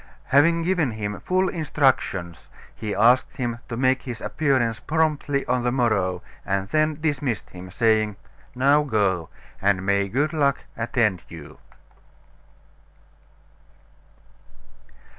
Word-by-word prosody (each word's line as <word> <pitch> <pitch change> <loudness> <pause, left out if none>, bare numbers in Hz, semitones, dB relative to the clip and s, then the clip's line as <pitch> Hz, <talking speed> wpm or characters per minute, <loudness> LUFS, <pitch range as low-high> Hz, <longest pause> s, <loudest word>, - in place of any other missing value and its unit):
Having 165 +5 +4
given 165 -7 +1
him 105 -2 -4
full 185 +1 +1
instructions, 130 - -1 0.2
he 105 -2 -4
asked 120 +5 +3
him 120 -2 -3
to 115 - -4
make 130 +1 +2
his 120 -4 -6
appearance 130 -7 0
promptly 150 -3 0
on 125 0 0
the 120 - +1
morrow, 100 -8 0 0.2
and 95 0 -1
then 155 +2 +1
dismissed 145 -7 -2
him, 90 0 -10
saying: 110 +1 +1 0.4
"Now 140 +4 +4
go; 100 - 0 0.3
and 95 -1 +1
may 100 0 +1
good 145 - 0
luck 140 -3 +1
attend 115 -4 0
you!" 75 -2 -11
120 Hz, 115 wpm, -23 LUFS, 100-145 Hz, 0.4 s, Having